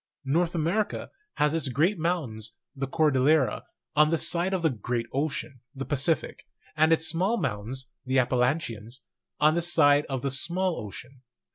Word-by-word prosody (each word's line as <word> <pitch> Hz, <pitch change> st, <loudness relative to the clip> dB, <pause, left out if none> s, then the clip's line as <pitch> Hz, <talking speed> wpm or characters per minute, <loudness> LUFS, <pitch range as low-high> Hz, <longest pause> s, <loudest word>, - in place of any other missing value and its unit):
North 170 Hz, +5 st, +1 dB
America 170 Hz, +7 st, -1 dB, 0.2 s
has 150 Hz, 0 st, +2 dB
its 160 Hz, -5 st, 0 dB
great 165 Hz, -, +1 dB
mountains, 135 Hz, -11 st, -2 dB, 0.2 s
the 135 Hz, 0 st, -3 dB
Cordillera, 145 Hz, -1 st, +2 dB, 0.3 s
on 150 Hz, 0 st, +5 dB
the 165 Hz, -, +2 dB
side 175 Hz, +3 st, 0 dB
of 185 Hz, -3 st, -1 dB
the 160 Hz, -, +3 dB
great 120 Hz, +1 st, -3 dB
ocean, 140 Hz, -1 st, -3 dB, 0.2 s
the 135 Hz, 0 st, -5 dB
Pacific; 150 Hz, +2 st, 0 dB, 0.3 s
and 155 Hz, +1 st, +4 dB
its 160 Hz, 0 st, +4 dB
small 185 Hz, +8 st, +1 dB
mountains, 120 Hz, -, -4 dB
the 130 Hz, +1 st, 0 dB
Appalachians, 125 Hz, -2 st, 0 dB, 0.4 s
on 150 Hz, +1 st, +5 dB
the 170 Hz, -, +1 dB
side 150 Hz, -4 st, +4 dB
of 135 Hz, -3 st, -4 dB
the 140 Hz, -, -1 dB
small 175 Hz, +3 st, 0 dB
ocean. 120 Hz, +6 st, -11 dB
145 Hz, 155 wpm, -27 LUFS, 130-165 Hz, 0.4 s, on